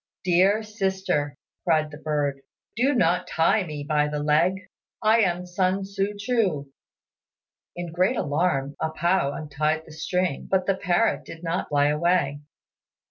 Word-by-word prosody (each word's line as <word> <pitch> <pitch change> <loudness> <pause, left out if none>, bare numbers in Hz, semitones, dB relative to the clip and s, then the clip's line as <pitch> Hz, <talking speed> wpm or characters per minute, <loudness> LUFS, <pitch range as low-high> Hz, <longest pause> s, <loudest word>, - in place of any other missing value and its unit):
"Dear 190 +4 +3
sister," 190 -9 -1 0.3
cried 155 -3 +2
the 145 - -9
bird, 145 -3 -1 0.3
"do 260 +5 +2
not 180 -3 +2
tie 170 +6 +2
me 150 -4 -6
by 150 -1 +2
the 150 0 -3
leg: 150 +5 +2 0.5
I 220 +2 +5
am 180 -4 +1
Sun 185 +2 0
Tzŭ 200 +1 -2
ch'u." 200 - 0 1.0
In 175 -1 -5
great 185 +8 +2
alarm 145 -3 0
A 160 - 0
pao 170 -1 +1
untied 155 +1 -2
the - - -13
string, 175 0 -2
but 190 -1 +2
the 195 - +2
parrot 190 +4 +1
did 165 +1 -11
not 170 +2 -2
fly 145 0 +3
away. 150 -2 +1
175 Hz, 145 wpm, -25 LUFS, 150-190 Hz, 1.0 s, I